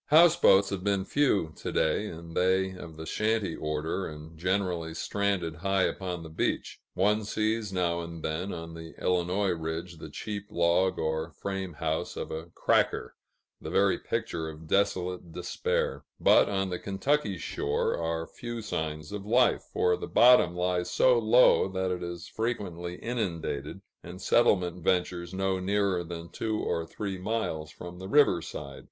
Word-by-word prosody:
Houseboats 155 - +6
have 95 -2 -3
been 100 -1 +1
few, 100 - +1
to - - -4
day, 80 +7 +1
and 85 -2 -9
they 95 +1 +2
of 85 -4 -10
the 80 - -7
shanty 110 -2 0
order 75 +4 -2
and 75 +1 -10
generally 90 -2 -1
stranded 95 -4 -1
high 95 +2 +1
upon 90 -3 -2
the 80 - -8
beach. 80 - -2 0.2
One 105 +4 +2
sees 110 0 -1
now 85 -2 0
and 85 -1 -7
then, 85 +5 -2
on 85 -1 -6
the 80 0 -9
Illinois 90 +2 +1
ridge, 85 +1 -4
the 80 - -8
cheap 100 +6 -5
log 85 +2 +2
or 80 +1 -1
frame 95 +1 -4
house 80 0 -2
of - - -4
a 80 +2 -5
"cracker," - - +1 0.5
the - - -6
very 100 0 +3
picture 80 -1 -3
of 80 +1 -10
desolate 90 -1 0
despair; 475 - -1 0.2
but - - +5
on 95 -1 -1
the 90 - -2
Kentucky 100 +1 0
shore 75 -3 -1
are 80 0 -2
few 120 +4 -7
signs 75 -6 -3
of 105 -1 -5
life, 120 +4 +3
for 90 0 +2
the - - -6
bottom 105 -9 +6
lies 90 0 0
so 125 +5 +4
low 115 0 +5
that 95 -1 -2
it 90 -1 -3
is 85 -1 -6
frequently 90 -7 -3
inundated, 90 - -3 0.2
and 90 +2 -9
settlement 90 -6 +2
ventures 90 -1 0
no 95 0 0
nearer 95 -1 +1
than 85 0 -7
two 110 +4 -2
or 85 -1 -1
three 95 +1 -4
miles 90 -7 -2
from 90 +3 -9
the 95 +1 -7
riverside. 105 - +2
90 Hz, 160 wpm, -29 LUFS, 85-100 Hz, 0.5 s, Houseboats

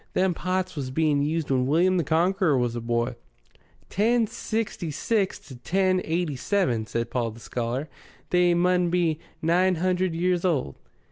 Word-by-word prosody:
Them 185 -1 +2
pots 185 +1 -2
was 135 -4 -4
being 150 +1 +1
used 155 0 -1
when 130 -1 +2
William 180 +6 +3
the 170 - +1
Conqueror 165 +1 +2
was 120 -1 0
a 120 - -3
boy." 120 +1 -1 0.7
"Ten 230 +4 +2
sixty 220 -5 -3
six 195 - 0
to 140 -3 -13
ten 185 +9 +1
eighty 165 -2 -1
seven," 125 - 0
said 115 +1 -3
Paul 120 -2 0
the 110 +1 -11
scholar. 120 +5 -3 0.4
"They 180 -1 +4
mun 180 0 +2
be 170 -3 +1 0.2
nine 180 +3 +3
hundred 185 0 0
years 180 +1 +1
old." 150 - 0
170 Hz, 160 wpm, -25 LUFS, 135-185 Hz, 0.7 s, They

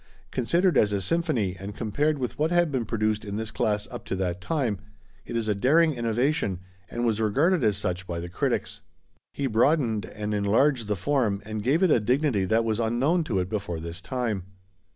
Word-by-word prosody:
Considered 170 +9 +2
as 105 - +3
a 100 - 0
symphony 115 - 0
and 100 +2 -7
compared 145 +8 0
with 125 0 -4
what 155 +2 +2
had 175 -2 +2
been 130 -4 -1
produced 110 -1 0
in 100 -1 -5
this 110 0 -3
class 105 -1 0
up - - -7
to - - -3
that 90 -1 -2
time, 120 - -1 0.5
it - - -5
is 115 -2 -1
a 105 - +2
daring 155 +10 +3
innovation 120 - 0 0.3
and 120 +1 -2
was 110 -1 +1
regarded 145 - +2
as 105 -3 +2
such 90 -1 -3
by 85 -1 -3
the 85 - -5
critics. 90 - -2 0.5
He 140 - -3
broadened 120 -2 +2
and 105 0 -4
enlarged 110 +4 +2
the 105 - 0
form 110 -1 0
and 110 0 -4
gave 140 - +2
it 180 - +4
a - - +5
dignity 125 -2 +1
that 110 +3 +2
was 110 0 0
unknown 130 +10 +2
to 115 -9 -1
it 90 -1 0
before 95 -5 -3
this 85 +2 -6
time. 110 -4 -2
110 Hz, 200 wpm, -26 LUFS, 100-140 Hz, 0.5 s, a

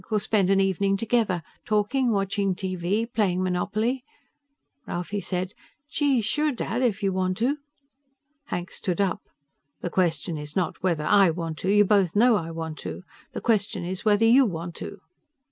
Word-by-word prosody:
We'll 215 -2 +2
spend 200 -2 +2
an 195 0 +4
evening 195 +1 +2
together 215 -6 +1 0.2
talking, 235 +4 +1
watching 195 -2 0
TV, 185 +3 -1
playing 185 -4 +1
Monopoly." 215 +8 -1 0.8
Ralphie 195 +4 -3
said, 185 +1 -3 0.4
"Gee, 280 -5 +2
sure, 300 +8 +1
Dad, 240 -1 -2
if 220 -4 0
you 195 -1 +1
want 185 0 0
to." 260 +6 +1 0.9
Hank 175 -8 -4
stood 180 -1 -3
up. 200 +1 +1 0.6
"The 175 - -3
question 165 -3 0
is 150 0 -9
not 180 -4 -1
whether 170 -5 0
I 200 +1 +5
want 165 -1 -4
to. 185 - -2
You 205 +1 +5
both 195 -4 +3
know 235 +2 +5
I 165 -5 -2
want 160 -1 -5
to. - - -6 0.3
The - - -4
question 205 -5 0
is 185 +1 -4
whether 215 +1 +4
you 250 +4 +7
want 175 -6 -3
to." 200 - -7
195 Hz, 165 wpm, -25 LUFS, 180-220 Hz, 0.9 s, you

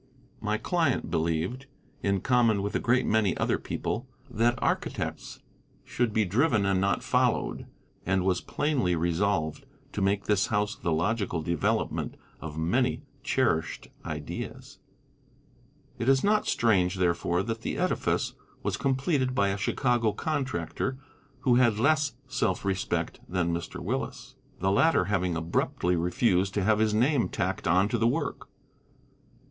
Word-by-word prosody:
My 105 0 -1
client 160 - 0
believed, 85 +11 -1 0.3
in 100 -1 +1
common 115 -5 +3
with 100 - -2
a - - +2
great 125 +2 +2
many 105 -4 +2
other - - +1
people, - - -3 0.2
that 120 +3 +2
architects - - -3 0.4
should 120 -2 -1
be 110 0 +2
driven 110 - +2
and 95 -1 +2
not 100 0 +1
followed, - - 0 0.4
and 95 0 +1
was 90 -2 +1
plainly 130 - 0
resolved 85 - 0 0.3
to 105 - -3
make 100 +1 +1
this 105 -2 +2
house 105 -1 0
the 85 - -2
logical 85 0 0
development 85 -1 -1 0.2
of 80 -1 -7
many 125 - +1 0.2
cherished 100 - 0
ideas. 75 -2 -6 1.2
It 120 - +1
is 135 -1 +4
not 210 +1 +2
strange, 95 -5 +2
therefore, 90 0 +1
that 115 0 -4
the - - -3
edifice - - 0 0.3
was - - -1
completed 135 -1 0
by 100 -5 +3
a 100 - 0
Chicago 120 0 +1
contractor 135 -1 -2 0.4
who 125 -2 +4
had 120 -4 +4
less 145 +2 +2
self 105 -8 -1
respect 95 -1 -1
than 85 -2 0
Mr. 85 0 -4
Willis, - - -4 0.3
the 95 +1 +1
latter 155 - +4
having 90 -3 0
abruptly 85 +2 0
refused 90 +2 +1
to 100 - +1
have 110 +2 +3
his 110 0 +3
name 125 +3 +2
tacked - - -2
on 90 +3 +4
to 120 -1 0
the 115 - +3
work. - - -2
105 Hz, 140 wpm, -28 LUFS, 90-125 Hz, 1.2 s, is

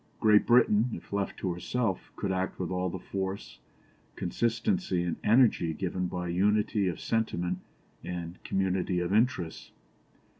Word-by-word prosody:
Great 105 -1 +5
Britain, 120 -1 +5
if - - -8
left 100 -1 -1
to 90 -2 -2
herself, 95 +2 -2
could 100 - -2
act 95 0 -2
with 90 -2 -3
all 90 0 0
the 95 - -4
force, 95 +2 -5 0.6
consistency, 120 - 0
and 85 -1 -2
energy 105 -8 +4
given 90 +1 -2
by 90 0 -4
unity 100 +3 +2
of 85 -3 -2
sentiment 90 -5 -1 0.4
and 85 0 -6
community 95 -1 0
of 90 +2 -1
interests. 105 -7 0
95 Hz, 140 wpm, -29 LUFS, 90-105 Hz, 0.6 s, Great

